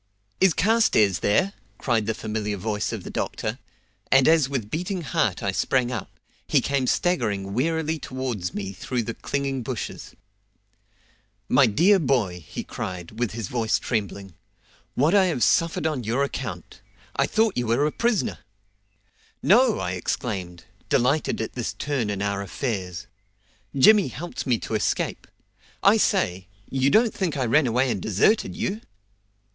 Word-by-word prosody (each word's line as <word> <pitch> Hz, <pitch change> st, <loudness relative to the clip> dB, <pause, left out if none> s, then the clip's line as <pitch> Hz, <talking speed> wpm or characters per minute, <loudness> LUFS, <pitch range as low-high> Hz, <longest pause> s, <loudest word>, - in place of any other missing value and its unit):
"Is 190 Hz, -4 st, +4 dB
Carstairs 190 Hz, -, +3 dB
there?" 180 Hz, -, +2 dB, 0.2 s
cried 115 Hz, -5 st, 0 dB
the 110 Hz, -, 0 dB
familiar 105 Hz, -2 st, -3 dB
voice 105 Hz, +2 st, -2 dB
of -, -, -5 dB
the -, -, -7 dB
doctor, -, -, -3 dB, 0.5 s
and 135 Hz, -1 st, +6 dB
as 160 Hz, -4 st, +4 dB
with 120 Hz, -7 st, -3 dB
beating 180 Hz, +2 st, -2 dB
heart 150 Hz, -, 0 dB
I 100 Hz, -, +1 dB
sprang 125 Hz, +5 st, +1 dB
up, 120 Hz, -, -4 dB, 0.4 s
he -, -, +4 dB
came 140 Hz, -2 st, 0 dB
staggering 105 Hz, -, 0 dB
wearily 160 Hz, +5 st, 0 dB
towards 125 Hz, -10 st, -4 dB
me 100 Hz, -1 st, -4 dB
through 120 Hz, +5 st, -3 dB
the 115 Hz, -, -4 dB
clinging 140 Hz, 0 st, -2 dB
bushes. 120 Hz, -1 st, -6 dB, 1.3 s
"My 130 Hz, 0 st, +5 dB
dear 180 Hz, -, +4 dB
boy," 115 Hz, -, 0 dB
he -, -, -5 dB
cried, 90 Hz, +4 st, -6 dB
with 120 Hz, -3 st, -1 dB
his 110 Hz, -3 st, -4 dB
voice 115 Hz, -3 st, 0 dB
trembling, 100 Hz, -4 st, -3 dB, 0.6 s
"what 150 Hz, +7 st, +3 dB
I 200 Hz, -2 st, +5 dB
have 160 Hz, -10 st, 0 dB
suffered 165 Hz, -1 st, +2 dB
on 150 Hz, -6 st, -1 dB
your 120 Hz, +6 st, 0 dB
account! 120 Hz, -10 st, -5 dB, 0.3 s
I -, -, +2 dB
thought 220 Hz, -2 st, +2 dB
you 120 Hz, -1 st, -1 dB
were 120 Hz, +6 st, +2 dB
a 150 Hz, -, +1 dB
prisoner." 235 Hz, +1 st, 0 dB, 1.0 s
"No!" 225 Hz, -, +5 dB
I 90 Hz, -, -2 dB
exclaimed, 90 Hz, -1 st, -4 dB, 0.3 s
delighted 140 Hz, +6 st, +1 dB
at 110 Hz, -, -4 dB
this 120 Hz, -3 st, -3 dB
turn 135 Hz, -7 st, -2 dB
in 100 Hz, -1 st, -2 dB
our 100 Hz, -1 st, -1 dB
affairs. 100 Hz, -3 st, -4 dB, 0.7 s
"Jimmy 205 Hz, +6 st, +6 dB
helped 145 Hz, +7 st, -6 dB
me 125 Hz, -3 st, +3 dB
to -, -, -5 dB
escape. 110 Hz, -, -1 dB, 0.6 s
I -, -, +6 dB
say, 90 Hz, +1 st, +1 dB, 0.2 s
you 135 Hz, 0 st, +2 dB
don't 225 Hz, +6 st, +4 dB
think 170 Hz, -7 st, -2 dB
I 130 Hz, -, 0 dB
ran 135 Hz, +4 st, +3 dB
away 125 Hz, +2 st, +1 dB
and 95 Hz, -, -3 dB
deserted 110 Hz, -, +2 dB
you?" 210 Hz, +4 st, -2 dB
125 Hz, 155 wpm, -24 LUFS, 105-155 Hz, 1.3 s, and